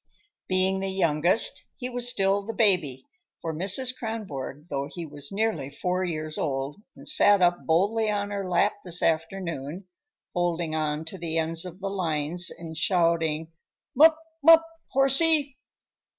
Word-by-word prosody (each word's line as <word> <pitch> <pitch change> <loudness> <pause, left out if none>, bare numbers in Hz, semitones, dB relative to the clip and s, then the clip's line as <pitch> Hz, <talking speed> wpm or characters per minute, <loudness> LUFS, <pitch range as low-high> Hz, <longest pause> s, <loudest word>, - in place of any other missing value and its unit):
Being 190 +1 +1
the 195 0 -2
youngest, 175 +1 +2
he 250 - -5
was 245 -1 -1
still 195 -3 +1
the 225 +3 -7
baby 175 - +2 0.3
for 165 - -4
Mrs. 200 +10 +1
Kronborg, 175 - -6
though 140 -2 -3
he 170 -2 -6
was 145 -2 -6
nearly 195 -9 -1
four 180 +6 -2
years 155 -3 -4
old 140 +5 -3
and - - -10
sat 205 -9 +5
up 175 -1 +2
boldly 205 +7 +2
on 205 -1 -2
her 200 -2 -3
lap 180 +4 +2
this 175 -1 -2
afternoon, 165 0 -2 0.5
holding 175 -2 -1
on 155 0 -1
to 185 +3 -7
the 165 -1 -2
ends 165 +1 -1
of 180 +1 -9
the 195 - -2
lines 170 -2 0
and 165 -1 -9
shouting 165 -2 +1 0.4
"'mup, 315 +4 +7 0.3
'mup, 330 +1 +8 0.2
horsey." 275 +1 +3
180 Hz, 150 wpm, -26 LUFS, 160-205 Hz, 0.5 s, mup